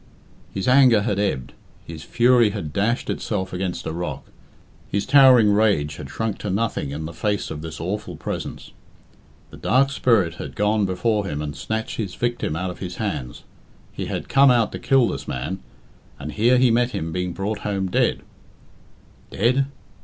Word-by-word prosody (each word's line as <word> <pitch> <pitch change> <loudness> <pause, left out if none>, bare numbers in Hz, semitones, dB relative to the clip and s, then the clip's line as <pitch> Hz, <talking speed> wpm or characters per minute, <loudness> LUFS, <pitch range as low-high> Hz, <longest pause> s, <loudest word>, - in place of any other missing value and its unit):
His 95 - -3
anger 125 -5 +6
had 100 -3 -1
ebbed, 65 -12 -2 0.3
his 80 -2 -8
fury 120 +4 +4
had 100 -8 -5
dashed 115 +5 0
itself 95 -4 -3
against 90 -1 -3
a - - -2
rock. 85 +1 -5 0.6
His 100 0 -1
towering 130 -6 +7
rage 100 -9 +2
had 70 -3 -8
shrunk 110 +5 -3
to 105 - -4
nothing 100 -7 -1
in 75 +3 -5
the 85 - -7
face 105 -2 -2
of 75 - -5
this 80 0 -7
awful 105 +5 -4
presence. - - -6 0.8
The - - -11
Dark 135 +2 +2
Spirit 110 -11 +2
had - - -7
gone 105 0 +1
before 105 +2 0
him 75 -5 -3
and 75 0 -4
snatched 110 +8 -4
his 100 -5 -4
victim 120 -9 -2
out 90 +2 -2
of 90 - -11
his 90 -2 -6
hands. 60 -6 -4 0.5
He - - -5
had - - -4
come 140 0 +5
out 120 -3 +3
to - - -6
kill 135 -3 +3
this - - -5
man, 75 +10 -4 0.6
and 75 - -6
here 120 +6 +3
he 125 -1 +4
met 120 +2 +1
him 80 +1 -3
being 90 +1 -2
brought 100 +5 -3
home 100 -2 -2
dead. 90 - +1 1.1
Dead? 130 +6 +1
100 Hz, 175 wpm, -22 LUFS, 85-115 Hz, 1.1 s, towering